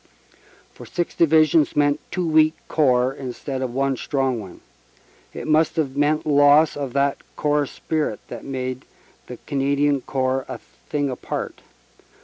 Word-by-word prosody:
For - - -12
six 175 -1 -3
Divisions 155 -1 +3
meant 145 0 +2
two 180 -2 -2
weak 155 0 +4
Corps 130 -4 +2
instead 135 0 -5
of 130 -2 -2
one 135 +1 0
strong 135 -2 -1
one. 95 -4 -11 0.7
It - - -7
must 155 +1 +3
have 140 -5 -1
meant 150 +2 +1
loss 145 +1 +5
of 140 -3 -4
that 140 0 +1 0.2
corps 150 -1 +1
spirit 155 +2 -3
that - - -8
made 130 -1 -4 0.4
the - - -8
Canadian 140 0 +1
Corps 130 0 -1
a - - -5 0.3
thing 145 -2 -1
apart. 125 - -5
140 Hz, 140 wpm, -22 LUFS, 130-155 Hz, 0.7 s, loss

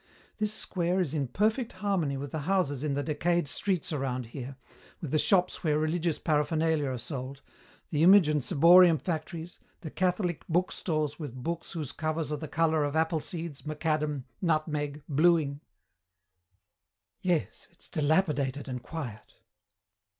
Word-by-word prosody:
This 210 -1 +1
square 185 -3 0
is 165 -6 0
in 145 -4 -1
perfect 220 - 0
harmony 185 -8 -1
with 140 0 -6
the 160 - -3
houses 145 -8 +1
in 145 -2 0
the 145 - -1
decayed 165 +2 0
streets 180 +4 0
around 130 -3 -2
here, 130 +3 -7 0.4
with 155 - -6
the 155 - +2
shops 180 +1 +2
where 150 -3 +2
religious 160 +1 0
paraphernalia 155 0 +1
are 130 - -3
sold, 135 +2 -6 0.5
the 150 - +1
image 185 0 +7
and 150 -3 +1
ciborium 170 +5 +7
factories, 165 +1 -5 0.2
the 155 - -7
Catholic 180 -2 0
bookstores 160 -3 -1
with 145 -6 -6
books 170 +2 -4
whose 155 -6 -4
covers 155 0 -2
are 150 - -1
the 155 - -6
colour 160 -1 +2
of 145 +1 -2
apple 160 0 +2
seeds, 165 -2 -6
macadam, 155 -2 -1 0.2
nutmeg, 150 -4 -1
bluing. 150 -1 +2 1.6
"Yes, 180 -5 -1
it's 175 - -7
dilapidated 145 -3 0
and 125 -2 -4
quiet." 125 -7 -7
155 Hz, 145 wpm, -29 LUFS, 145-175 Hz, 1.6 s, image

